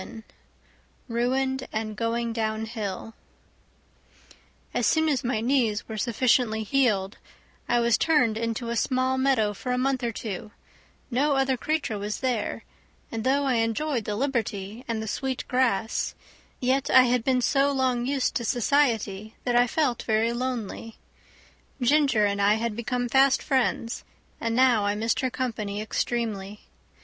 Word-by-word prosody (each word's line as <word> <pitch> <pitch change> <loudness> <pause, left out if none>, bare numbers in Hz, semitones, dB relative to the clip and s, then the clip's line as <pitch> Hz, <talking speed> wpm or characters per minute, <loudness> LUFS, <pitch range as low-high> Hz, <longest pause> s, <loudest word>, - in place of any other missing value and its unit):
27 220 +4 -10 0.9
Ruined 260 +3 0
and 215 0 -3
Going 230 +1 -1
Downhill 220 -1 -3 1.6
As - - +1
soon 315 0 +3
as 280 -5 +1
my 235 -3 -1
knees 230 -4 +1
were 220 - -6
sufficiently 235 0 +1
healed 210 -5 +1 0.5
I 240 - +3
was 235 -1 +3
turned 255 -9 +3
into 230 +1 -3
a 235 - -1
small 260 +2 +1
meadow 255 -6 +2
for 250 +5 -5
a 250 - +1
month 265 0 0
or 235 - 0
two; 215 -2 -6 0.6
no 280 +4 +2
other 270 -1 +2
creature 280 -5 -2
was 210 +1 -4
there; 245 -5 -1 0.5
and 225 -1 -3
though 275 +2 +2
I 260 -3 +1
enjoyed 230 +1 -1
the 210 - -2
liberty 225 -4 -2
and 225 -2 -2
the - - -6
sweet 265 +3 -3
grass, 235 -4 0 0.4
yet 260 +2 +1
I 255 - +7
had 245 -1 +1
been 255 0 +2
so 275 +3 +2
long 255 -3 0
used 275 -1 0
to 235 - -4
society 225 -5 0
that 245 - 0
I 245 0 +5
felt 250 -3 0
very 225 +1 +1
lonely. 240 -3 -4 0.8
Ginger 270 -4 +3
and 200 0 0
I 205 +1 +4
had 225 -1 -2
become 245 +2 -2
fast 265 +2 +4
friends, 240 -4 0 0.4
and 230 0 -1
now 250 -4 +4
I 205 0 0
missed 225 +2 0
her 260 - 0
company 220 -5 -3
extremely. 215 -2 -3
235 Hz, 150 wpm, -26 LUFS, 220-260 Hz, 1.6 s, I